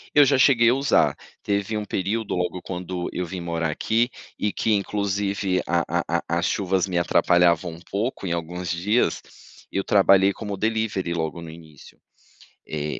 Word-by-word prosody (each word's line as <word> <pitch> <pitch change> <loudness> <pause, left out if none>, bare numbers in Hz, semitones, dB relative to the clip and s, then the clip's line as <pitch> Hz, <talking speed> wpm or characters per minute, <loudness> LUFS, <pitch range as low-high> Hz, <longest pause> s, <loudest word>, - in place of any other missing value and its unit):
Eu 145 - +8
já 140 0 +3
cheguei 120 -3 +5
a - - +3
usar, 140 +1 +2 0.3
teve 100 +1 -1
um 105 - -2
período 105 +3 -2
logo 90 0 -2
quando 90 -1 -4
eu 90 - -2
vim 90 +1 -6
morar 85 -2 -2
aqui 115 +10 0 0.3
e 105 0 -1
que 110 - 0
inclusive, 100 -1 0
a 85 0 +1
a 85 +2 0 0.2
a 85 0 -2
as 85 - 0
chuvas 95 -1 0
me 90 -2 0
atrapalhavam 85 0 +3
um 85 - -13
pouco 105 +1 -2
em 85 - -1
alguns 85 +1 -4
dias. 105 +7 +1 0.5
Eu 95 - -2
trabalhei 100 -1 +5
como 105 -1 -5
delivery, 110 -5 -1
logo 80 0 -3
no 85 - -9
início. 80 -3 -14 0.7
Eh, 75 -1 -4
95 Hz, 170 wpm, -24 LUFS, 85-105 Hz, 0.7 s, Eu